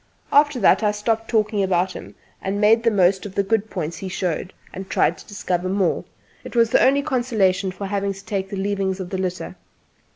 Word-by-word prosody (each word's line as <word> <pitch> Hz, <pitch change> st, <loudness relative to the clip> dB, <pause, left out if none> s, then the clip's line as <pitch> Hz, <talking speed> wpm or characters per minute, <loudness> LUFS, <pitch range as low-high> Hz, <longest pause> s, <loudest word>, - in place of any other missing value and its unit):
After 290 Hz, -2 st, +4 dB
that 195 Hz, -, +5 dB
I 210 Hz, -, +2 dB
stopped 225 Hz, +2 st, -1 dB
talking 215 Hz, -2 st, +1 dB
about 185 Hz, -1 st, +1 dB
him, -, -, -10 dB, 0.3 s
and 195 Hz, +1 st, -2 dB
made 220 Hz, +2 st, +5 dB
the 230 Hz, -, +3 dB
most 190 Hz, -2 st, +2 dB
of 195 Hz, -, -13 dB
the 200 Hz, -, +2 dB
good 220 Hz, +1 st, 0 dB
points 170 Hz, -2 st, -4 dB
he 190 Hz, -, -6 dB
showed, 180 Hz, 0 st, -3 dB, 0.2 s
and 190 Hz, +1 st, -7 dB
tried -, -, +2 dB
to -, -, -14 dB
discover 185 Hz, -3 st, -2 dB
more. 190 Hz, -2 st, 0 dB, 0.4 s
It -, -, -10 dB
was 230 Hz, -1 st, +3 dB
the -, -, +4 dB
only 280 Hz, +2 st, +3 dB
consolation 215 Hz, -9 st, +1 dB
for 185 Hz, +2 st, -6 dB
having 200 Hz, 0 st, -1 dB
to 195 Hz, +1 st, -13 dB
take 195 Hz, -3 st, -3 dB
the 200 Hz, -, -5 dB
leavings 195 Hz, -1 st, -1 dB
of 180 Hz, -1 st, -6 dB
the 190 Hz, -, -2 dB
litter. 185 Hz, -1 st, -4 dB
200 Hz, 215 wpm, -22 LUFS, 190-220 Hz, 0.4 s, that